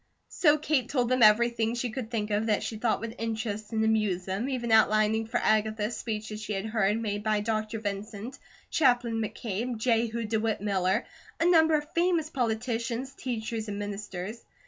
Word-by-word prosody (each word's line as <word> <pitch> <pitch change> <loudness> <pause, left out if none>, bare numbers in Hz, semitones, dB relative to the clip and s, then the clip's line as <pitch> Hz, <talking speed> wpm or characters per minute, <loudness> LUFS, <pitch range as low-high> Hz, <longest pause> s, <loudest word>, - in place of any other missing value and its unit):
So 300 -3 +4
Kate 295 -5 0
told 245 -4 +1
them 255 -1 +2
everything 230 +1 +4
she 240 -1 -2
could 225 -1 -5
think 215 -3 -2
of 210 +2 +1
that 210 -2 +1
she 225 - -4
thought 225 +1 0
would 230 0 -5
interest 220 -1 -3
and 220 -1 +1
amuse 210 -5 +1
them, 195 +7 -2
even 240 -3 -2
outlining 220 0 +4
for 235 +2 -1
Agatha 215 0 +1
speeches 215 -2 -4
she 210 0 -4
had 195 +1 -3
heard 215 -1 +1
made 205 -2 -2
by 215 0 +1
Dr. 215 0 -2
Vincent, 210 +3 -5 0.3
Chaplain 245 -5 +2
McCabe, 225 +2 -3
Jehu 230 0 +1
DeWitt 220 0 0
Miller, 190 -2 0 0.3
a 330 - +2
number 320 -2 +5
of 300 +1 -3
famous 335 -2 +1
politicians, 235 +1 -2
teachers, 225 -4 -4
and 205 -1 -4
ministers. 205 +1 -5
225 Hz, 170 wpm, -28 LUFS, 210-240 Hz, 0.3 s, number